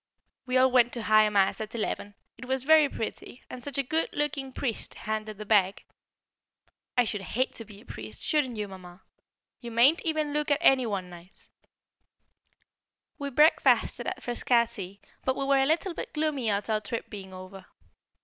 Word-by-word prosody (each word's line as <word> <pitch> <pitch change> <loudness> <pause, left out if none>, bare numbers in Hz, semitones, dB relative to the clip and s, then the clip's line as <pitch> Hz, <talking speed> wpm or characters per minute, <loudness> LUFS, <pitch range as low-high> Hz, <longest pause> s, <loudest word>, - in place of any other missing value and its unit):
We 255 0 +2
all 260 0 +5
went 245 -1 +4
to 235 - -3
High 215 -1 +5
Mass 200 0 +2
at 215 +2 -6
eleven; 205 -2 -3 0.2
it 255 - -10
was 260 0 -2
very 310 0 +6
pretty, 235 +1 -6
and 255 - -7
such 280 +1 -3
a 275 - +1
good 320 +5 -1
looking 280 -2 -2
priest 250 -3 -4
handed 215 -1 -4
the 210 - -7
bag. 200 -2 +2 1.1
I 245 - +6
should 210 -3 -3
hate 245 +8 -1
to 230 - -8
be 205 -1 -13
a - - -19
priest; 110 -1 -8
shouldn't 265 -7 0
you, 210 -1 -3
Mamma? 185 -1 -12 0.6
You 235 - -8
mayn't 245 +8 +4
even 310 -3 -1
look 300 +1 -1
at 285 - +3
any 265 -7 +4
one 190 -4 -4
nice. 175 +2 -12 1.7
We 280 -1 -3
breakfasted 300 +4 +3
at - - -4
Frascati, 235 -6 0 0.2
but 260 - 0
we 275 - -2
were 275 0 +3
a 270 - +2
little 335 +4 +1
bit - - -7
gloomy 300 -6 0
at 200 0 -1
our 215 -1 0
trip 230 +2 -5
being 195 -3 -8
over. 185 +1 -11
235 Hz, 180 wpm, -28 LUFS, 205-275 Hz, 1.7 s, very